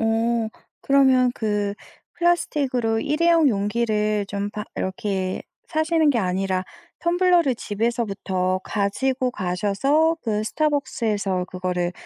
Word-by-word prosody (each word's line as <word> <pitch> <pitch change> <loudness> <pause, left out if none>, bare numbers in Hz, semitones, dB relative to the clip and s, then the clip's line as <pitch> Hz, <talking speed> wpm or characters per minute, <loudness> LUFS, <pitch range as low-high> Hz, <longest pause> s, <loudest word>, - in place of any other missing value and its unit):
어. 225 0 +1 0.3
그러면 260 -2 +4
그 205 -2 -1 0.4
플라스틱으로 275 -10 +1
일회용 325 +2 +3
용기를 210 -1 0
좀 200 0 -3
바 210 0 -5
이렇게 190 0 -2 0.3
사시는 315 -1 +2
게 255 - +1
아니라 185 -1 -1 0.4
텀블러를 345 -6 +3
집에서부터 200 -4 -1
가지고 255 +6 0
가셔서 210 - +1
그 215 -2 -1
스타벅스에서 220 -10 -1
그거를 180 -1 -2
225 Hz, 270 characters per minute, -23 LUFS, 200-275 Hz, 0.4 s, 그러면